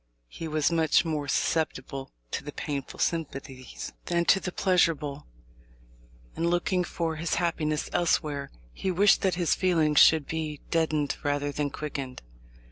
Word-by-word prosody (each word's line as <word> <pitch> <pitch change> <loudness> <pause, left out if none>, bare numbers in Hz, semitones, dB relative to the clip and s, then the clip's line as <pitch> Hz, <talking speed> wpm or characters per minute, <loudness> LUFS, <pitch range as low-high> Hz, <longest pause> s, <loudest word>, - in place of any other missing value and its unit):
He 165 - -6
was 155 +1 +1
much 165 -1 +3
more 150 -3 -2
susceptible 135 -3 -1 0.2
to - - -3
the - - -6
painful 140 -2 -5
sympathies 135 -5 -3
than 170 0 +1
to 195 - +5
the 185 - -4
pleasurable, 165 - +1 1.1
and, 170 +1 0
looking 175 +1 +1
for 165 -2 -3
his 165 +1 -1
happiness 160 -3 0
elsewhere, 150 -5 0 0.2
he 190 - -3
wished 195 +3 +4
that 190 -2 +1
his 175 -2 +2
feelings 160 -6 +3
should 160 -3 +6
be 155 -2 -4
deadened 155 -3 +1
rather 145 0 0
than 145 0 -1
quickened. 140 - -6
155 Hz, 140 wpm, -27 LUFS, 145-170 Hz, 1.1 s, should